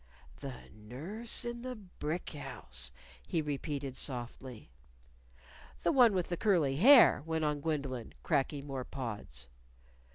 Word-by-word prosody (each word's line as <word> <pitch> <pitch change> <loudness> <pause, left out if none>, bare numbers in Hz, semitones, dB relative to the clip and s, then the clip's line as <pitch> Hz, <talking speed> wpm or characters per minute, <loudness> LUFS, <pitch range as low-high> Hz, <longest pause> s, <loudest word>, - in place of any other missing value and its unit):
"The 135 -3 -7
nurse 160 - -4
in 240 0 -4
the 255 0 -5
brick 180 -5 -5
house!" 65 - -6 0.4
he 165 - 0
repeated 145 -2 -3
softly. 125 - -5 1.1
"The 170 - +4
one 240 -6 +6
with 180 -2 0
the 175 - -1
curly 160 -11 +2
hair," 245 - +8
went 160 -1 0
on 150 -1 0
Gwendolyn, 140 -6 -3
cracking 145 -2 0
more 135 -2 -4
pods. 105 - -6
145 Hz, 125 wpm, -33 LUFS, 130-180 Hz, 1.1 s, hair